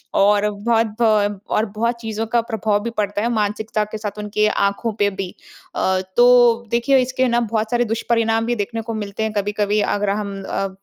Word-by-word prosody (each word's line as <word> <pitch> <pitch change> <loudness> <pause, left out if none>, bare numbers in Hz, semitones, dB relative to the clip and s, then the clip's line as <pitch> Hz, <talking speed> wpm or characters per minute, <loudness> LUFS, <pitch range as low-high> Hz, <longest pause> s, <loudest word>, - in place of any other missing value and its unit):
और 205 +1 +4
बहुत 225 +2 +1
भ 205 -3 +2
और 215 - +2
बहुत 235 +2 0
चीज़ों 220 0 -3
का 235 +2 +2
प्रभाव 220 -3 -1
भी 235 - -2
पड़ता 205 -1 -1
है 235 - 0
मानसिकता 215 0 -1
के 210 +1 -7
साथ 210 -1 -6
उनकी 210 0 0
आँखों 200 +2 0
पे 205 0 +3
भी। 190 -2 -5 0.5
अ, 190 0 +1 0.2
तो 240 -1 +5
देखिए 240 +4 +3
इसके 260 +1 0
ना 240 0 +2
बहुत 220 -1 -2
सारे 240 0 +2
दुष्परिणाम 225 0 0
भी 240 - 0
देखने 225 +1 -3
को 225 +1 -5
मिलते 210 0 -4
हैं 220 - -1
कभी-कभी, 205 0 0
अगर 205 0 0
हम 200 -1 -3
अ, 195 0 -2
215 Hz, 195 wpm, -20 LUFS, 205-230 Hz, 0.5 s, तो